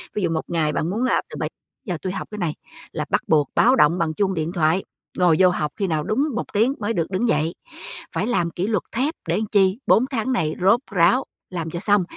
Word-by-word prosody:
Ví 210 - -1
dụ 170 - +2
1 160 -1 -1
ngày 155 -3 0
bạn 160 - -1
muốn 220 +6 -1
là 255 - +2
từ - - -8
7 - - -2 0.4
giờ 180 -6 -2
tui 185 - -3
học - - -5
cái 210 - -6
này 170 -6 -1 0.4
là - - -3
bắt - - +2
buộc 150 -3 +3
báo 250 +2 +5
động 170 - +4
bằng 165 -3 0
chuông 195 +3 0
điện 160 -1 -2
thoại. 165 +1 +2 0.3
Ngồi 180 -3 +4
vô 185 -1 +6
học 150 -4 -2
khi 195 -2 0
nào 155 -3 0
đúng 235 - +1
1 235 - -4
tiếng 230 +6 +3
mới 225 +1 -1
được 170 +1 -2
đứng 210 +6 0
dậy. 155 +3 +1 0.6
Phải - - 0
làm 175 -9 0
kỷ 180 +5 -2
luật 215 -4 0
thép 270 +7 0 0.2
để - - +1
chi? 195 0 +3
4 245 - +5
tháng 255 +1 -1
này 160 -10 0
rốt 200 +6 +5
ráo, 190 +8 +4 0.3
làm 165 -3 -4
cho 170 - -4
xong, 205 +1 +3
185 Hz, 245 wpm, -22 LUFS, 165-215 Hz, 0.6 s, vô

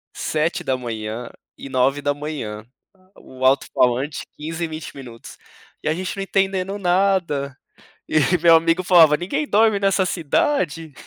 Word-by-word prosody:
7 160 +3 -1
da 130 -5 -1
manhã 115 -1 -5 0.3
e 140 - -9
9 130 +2 +1
da 145 0 0
manhã. 140 -8 -6 0.5
O 130 0 -7
altofalante 130 +1 +1
15 160 +3 -5
e - - -4
20 155 0 -8
minutos, 120 -4 -11 0.5
e - - -4
a - - +2
gente 185 +3 -4
não 195 - -2
entendendo 195 0 -1
nada. 180 -7 0 0.5
E - - -1 0.3
meu 170 -1 +7
amigo 165 +2 +1
falava, 165 -4 +6
ninguém 185 - -3
dorme 215 0 +3
nessa 195 -1 +2
cidade? 165 - -1
155 Hz, 145 wpm, -21 LUFS, 135-185 Hz, 0.5 s, meu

